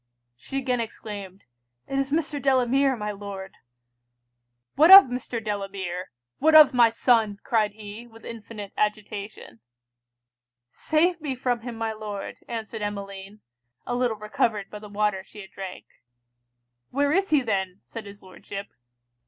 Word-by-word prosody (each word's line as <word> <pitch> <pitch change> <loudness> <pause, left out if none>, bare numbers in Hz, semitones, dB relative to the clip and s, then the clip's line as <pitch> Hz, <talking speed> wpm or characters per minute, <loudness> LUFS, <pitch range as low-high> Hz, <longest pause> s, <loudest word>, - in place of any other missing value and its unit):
She 270 - -6
again 255 -2 0
exclaimed, 205 -4 -7 0.4
'it 275 - -1
is 275 0 -1
Mr. 300 -2 -1
Delamere, 265 0 +3
my 210 -2 -3
Lord!' 200 -1 -8 1.2
'What 315 +4 +5
of 390 +1 +13
Mr. 245 -1 -4
Delamere? 195 -4 -4 0.3
what 315 +2 +4
of 300 -4 +9
my 240 -2 +6
son?' 225 -3 +2
cried 215 -3 +1
he, 215 +2 -10
with 225 -1 -16
infinite 215 -3 -8
agitation. 210 - -3 1.1
'Save 335 +2 +1
me 285 -4 -3
from 250 -1 -1
him 240 0 -6
my 225 0 -2
Lord!' 210 -2 -6
answered 225 -1 -5
Emmeline, 200 0 -6 0.4
a 245 - -3
little 245 -3 0
recovered 210 -1 -1
by 210 - -7
the 210 0 -11
water 205 -2 0
she 210 +2 -12
had 190 - -13
drank. 190 -2 -8 1.0
'Where 285 +2 +1
is 390 +4 +2
he 300 -3 +4
then?' 195 -5 -2
said 225 -3 -9
his 200 0 -12
Lordship. 195 +1 -9
220 Hz, 145 wpm, -25 LUFS, 200-255 Hz, 1.2 s, of